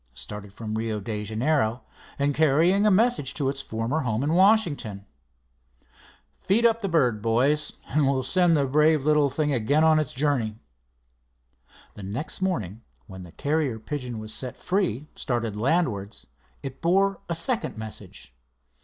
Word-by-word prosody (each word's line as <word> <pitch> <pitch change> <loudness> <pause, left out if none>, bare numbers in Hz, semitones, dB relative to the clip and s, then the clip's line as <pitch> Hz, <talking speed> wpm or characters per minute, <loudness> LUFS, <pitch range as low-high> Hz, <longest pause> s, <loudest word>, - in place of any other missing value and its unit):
"Started 105 +10 -8
from 110 +1 -6
Rio 110 -1 -2
de 105 +1 -4
Janeiro 115 +2 0 0.3
and 140 +1 +1
carrying 160 +8 +3
a - - +6
message 210 - +2
to 140 -3 0
its 135 0 -4
former 115 +7 -2
home 120 -3 -1
in 150 +3 0
Washington. 170 - +2 1.3
Feed 220 +5 +2
up 230 0 +3
the 195 - -2
bird, 125 -10 +2
boys, 135 +7 +1 0.2
and 145 -2 +2
we'll 130 -1 0
send 175 +3 +3
the 140 - +2
brave 150 +1 +3
little 150 -2 +3
thing 150 +1 -1
again 135 +6 +2
on 160 -1 +5
its 155 -4 -3
journey." 130 -6 0 1.4
The - - -11
next 110 - -4
morning 115 - -2 0.2
when 95 -3 -10
the 90 -2 -11
carrier 145 - -1
pigeon 125 0 -5
was 110 0 -6
set 125 -2 -6
free, 175 - -1
started 115 -4 -2
landwards, 115 - -1 0.4
it 135 -1 -7
bore 195 +4 +2
a 170 - -1
second 225 - -2
message. 110 - -9
140 Hz, 155 wpm, -25 LUFS, 110-160 Hz, 1.4 s, a